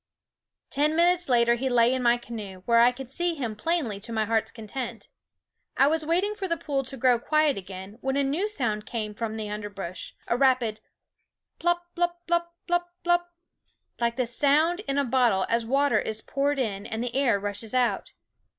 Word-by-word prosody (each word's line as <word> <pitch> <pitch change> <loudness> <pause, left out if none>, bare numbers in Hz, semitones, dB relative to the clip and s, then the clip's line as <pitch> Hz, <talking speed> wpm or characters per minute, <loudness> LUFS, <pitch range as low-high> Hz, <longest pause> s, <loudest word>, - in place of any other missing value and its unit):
Ten 300 +3 +1
minutes 350 -1 +3
later 235 -1 +4
he 260 +3 -1
lay 240 0 +4
in 260 - -1
my 240 0 +4
canoe, 205 -6 -8
where 235 -1 +4
I 240 +1 +6
could 260 +1 -8
see 345 +6 -1
him 240 -7 -3
plainly 245 -5 -1
to 215 - -8
my 220 -1 0
heart's 225 0 +1
content. 230 +1 -6 0.7
I - - +6
was 315 +2 +1
waiting 360 +7 +1
for 395 -2 -4
the 335 -2 0
pool 285 -4 -2
to 270 +1 -7
grow 245 -1 +3
quiet 305 +2 +2
again, 190 +2 -9
when 265 +1 -1
a 280 - +2
new 305 +10 0
sound 220 - -2
came 215 -3 -3
from 220 0 -4
the 215 -1 -4
underbrush, 200 -4 -6
a - - +1
rapid 250 -5 +2 0.8
plop, 345 0 +1
lop, 350 0 +1
lop, 340 0 +1 0.2
lop, 350 0 +1 0.2
lop, 350 0 +3 0.7
like 235 0 +1
the 255 -1 0
sound 295 +8 +2
in 275 0 0
a 285 - +2
bottle 235 -6 +3
as 230 0 +1
water 280 +3 +3
is 220 0 -3
poured 285 +3 -1
in 210 -6 -2
and 225 +1 -3
the 245 0 -4
air 260 -7 +3
rushes 205 +3 -5
out. 250 -2 0
250 Hz, 190 wpm, -26 LUFS, 220-300 Hz, 0.8 s, I